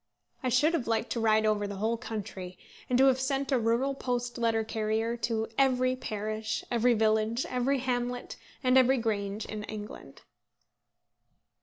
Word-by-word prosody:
I 255 Hz, -, 0 dB
should 295 Hz, +7 st, +3 dB
have 280 Hz, -8 st, -1 dB
liked 225 Hz, +1 st, 0 dB
to 235 Hz, -, -1 dB
ride 220 Hz, -1 st, +3 dB
over 210 Hz, -1 st, +1 dB
the 200 Hz, -, -5 dB
whole 220 Hz, +4 st, 0 dB
country, 200 Hz, -6 st, -6 dB, 0.3 s
and 250 Hz, -, +3 dB
to 265 Hz, -, +6 dB
have 260 Hz, -1 st, +4 dB
sent 270 Hz, +1 st, -1 dB
a 260 Hz, -, +3 dB
rural 235 Hz, +5 st, +1 dB
post 245 Hz, -3 st, -3 dB
letter 225 Hz, -1 st, +2 dB
carrier 220 Hz, +1 st, -1 dB
to 225 Hz, -1 st, -1 dB
every 255 Hz, -1 st, +3 dB
parish, 215 Hz, -2 st, -3 dB
every 240 Hz, 0 st, +3 dB
village, 220 Hz, +2 st, +1 dB
every 255 Hz, +2 st, +1 dB
hamlet, 245 Hz, -1 st, -2 dB, 0.3 s
and 255 Hz, 0 st, +5 dB
every 260 Hz, +1 st, +4 dB
grange 210 Hz, -2 st, -2 dB
in 215 Hz, -1 st, -6 dB
England. 210 Hz, -1 st, -9 dB
230 Hz, 160 wpm, -29 LUFS, 215-255 Hz, 0.3 s, to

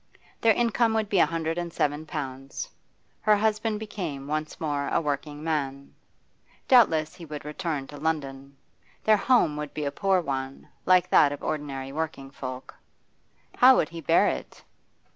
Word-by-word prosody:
Their 225 Hz, -2 st, +5 dB
income 230 Hz, -1 st, +2 dB
would 220 Hz, -2 st, 0 dB
be 195 Hz, -, +2 dB
a -, -, +5 dB
hundred 165 Hz, +1 st, -2 dB
and 175 Hz, -1 st, -4 dB
seven 150 Hz, 0 st, -1 dB
pounds. 135 Hz, -3 st, -5 dB, 0.5 s
Her 215 Hz, 0 st, +4 dB
husband 215 Hz, 0 st, 0 dB
became 180 Hz, -11 st, -5 dB
once 155 Hz, +1 st, -3 dB
more 145 Hz, -3 st, -1 dB
a -, -, +1 dB
working 145 Hz, 0 st, -3 dB
man. 140 Hz, -4 st, -3 dB, 0.7 s
Doubtless 165 Hz, -12 st, +4 dB
he 175 Hz, -, -12 dB
would 150 Hz, -2 st, -7 dB
return 150 Hz, -2 st, -3 dB
to 145 Hz, -, -11 dB
London; 140 Hz, -3 st, -3 dB, 0.5 s
their 215 Hz, -1 st, +5 dB
home 200 Hz, -, +3 dB
would 150 Hz, -1 st, -6 dB
be 150 Hz, -, -2 dB
a 140 Hz, -, -1 dB
poor 195 Hz, +2 st, +2 dB
one, 135 Hz, -4 st, -4 dB, 0.2 s
like 180 Hz, -1 st, +5 dB
that 145 Hz, -, +6 dB
of 145 Hz, -, -7 dB
ordinary 135 Hz, -3 st, -4 dB
working 145 Hz, -3 st, -4 dB
folk. 130 Hz, -2 st, -7 dB, 0.8 s
How 260 Hz, +1 st, +8 dB
would 155 Hz, -, +1 dB
he 165 Hz, 0 st, -8 dB
bear 140 Hz, -, +4 dB
it? -, -, -4 dB
155 Hz, 160 wpm, -26 LUFS, 140-185 Hz, 0.8 s, How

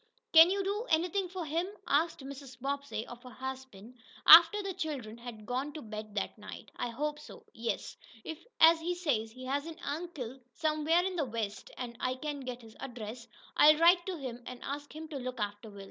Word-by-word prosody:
"Can 325 Hz, +1 st, +10 dB
you 395 Hz, +1 st, 0 dB
do 415 Hz, +5 st, -2 dB
anything 360 Hz, +4 st, +1 dB
for 365 Hz, -2 st, -5 dB
him?" 330 Hz, +4 st, -1 dB, 0.2 s
asked 310 Hz, +2 st, +1 dB
Mrs. 270 Hz, -2 st, -9 dB
Bobbsey 280 Hz, -3 st, -3 dB
of 240 Hz, 0 st, -10 dB
her 250 Hz, -, -11 dB
husband, 255 Hz, -3 st, -8 dB, 0.3 s
after 340 Hz, +6 st, +10 dB
the 390 Hz, -1 st, -3 dB
children 290 Hz, -, -4 dB
had 235 Hz, -3 st, -9 dB
gone 260 Hz, +5 st, -2 dB
to 310 Hz, -, -7 dB
bed 215 Hz, -1 st, -7 dB
that 210 Hz, -, -3 dB
night. 210 Hz, -, -10 dB
"I 245 Hz, -, -3 dB
hope 295 Hz, +5 st, -3 dB
so, 450 Hz, +9 st, -12 dB
yes. 230 Hz, 0 st, -3 dB, 0.3 s
If, 320 Hz, +1 st, -7 dB, 0.2 s
as 325 Hz, 0 st, +8 dB
he 350 Hz, +2 st, -2 dB
says, 255 Hz, -11 st, -1 dB
he 255 Hz, +2 st, -10 dB
has 280 Hz, +4 st, -1 dB
an 330 Hz, -1 st, -8 dB
uncle 285 Hz, -5 st, -5 dB, 0.2 s
somewhere 315 Hz, +2 st, +2 dB
in 375 Hz, -1 st, -2 dB
the 305 Hz, -, +1 dB
West, 220 Hz, -4 st, -4 dB
and 240 Hz, -2 st, -5 dB
I 255 Hz, 0 st, 0 dB
can 290 Hz, +1 st, -4 dB
get 250 Hz, -2 st, -6 dB
his 225 Hz, -1 st, -14 dB
address, 235 Hz, -2 st, -7 dB, 0.3 s
I'll 305 Hz, +1 st, +7 dB
write 345 Hz, +2 st, +6 dB
to 370 Hz, -2 st, -3 dB
him, 250 Hz, -4 st, -6 dB
and 250 Hz, -1 st, -8 dB
ask 290 Hz, +1 st, -5 dB
him 315 Hz, +1 st, -7 dB
to 295 Hz, -, -5 dB
look 255 Hz, -1 st, -5 dB
after 205 Hz, +1 st, -4 dB
Will. 200 Hz, -1 st, -12 dB
280 Hz, 205 wpm, -31 LUFS, 240-325 Hz, 0.3 s, Can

